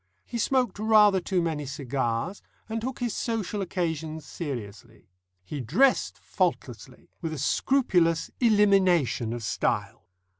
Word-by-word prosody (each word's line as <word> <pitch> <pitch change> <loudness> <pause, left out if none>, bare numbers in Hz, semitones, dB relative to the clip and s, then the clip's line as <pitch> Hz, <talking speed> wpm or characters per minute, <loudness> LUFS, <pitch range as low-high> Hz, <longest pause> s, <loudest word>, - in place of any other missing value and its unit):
He 235 - -5
smoked 250 -4 +1
rather 210 -3 +5
too 180 -1 0
many 150 -4 -2
cigars, 135 - -2 0.3
and 225 0 -3
took 255 +2 -4
his 240 -3 -2
social 215 -3 -2
occasions 160 -4 -3
seriously. 115 - -8 0.3
He 140 +10 -6
dressed 205 - +2
faultlessly, - - -3
with 165 -2 -3
a - - -5
scrupulous 170 - +1
elimination 195 - +3
of 120 -1 -5
style. 85 - -2
175 Hz, 120 wpm, -27 LUFS, 140-215 Hz, 0.3 s, rather